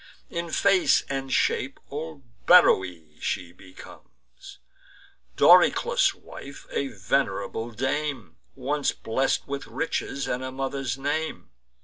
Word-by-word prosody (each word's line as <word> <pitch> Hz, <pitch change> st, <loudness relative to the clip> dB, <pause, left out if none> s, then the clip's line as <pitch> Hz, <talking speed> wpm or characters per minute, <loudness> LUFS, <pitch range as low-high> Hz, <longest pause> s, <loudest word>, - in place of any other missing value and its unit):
In 170 Hz, 0 st, -3 dB
face 195 Hz, +2 st, +3 dB
and 135 Hz, -1 st, -3 dB
shape 135 Hz, +2 st, 0 dB
old 150 Hz, 0 st, -6 dB, 0.2 s
Beroe 90 Hz, -, +4 dB
she 90 Hz, -2 st, -3 dB
became, 90 Hz, +1 st, -14 dB, 1.4 s
Doryclus' -, -, +5 dB
wife, 140 Hz, 0 st, -11 dB
a 140 Hz, -, -1 dB
venerable 100 Hz, 0 st, -2 dB
dame, 130 Hz, -, -3 dB, 0.2 s
Once 145 Hz, +2 st, -1 dB
blest 130 Hz, +4 st, -1 dB
with 140 Hz, 0 st, -5 dB
riches, 140 Hz, -3 st, -3 dB
and 125 Hz, +1 st, -2 dB
a 130 Hz, -, -4 dB
mother's 135 Hz, 0 st, -3 dB
name. 145 Hz, +4 st, -3 dB
135 Hz, 105 wpm, -26 LUFS, 110-145 Hz, 1.4 s, Doryclus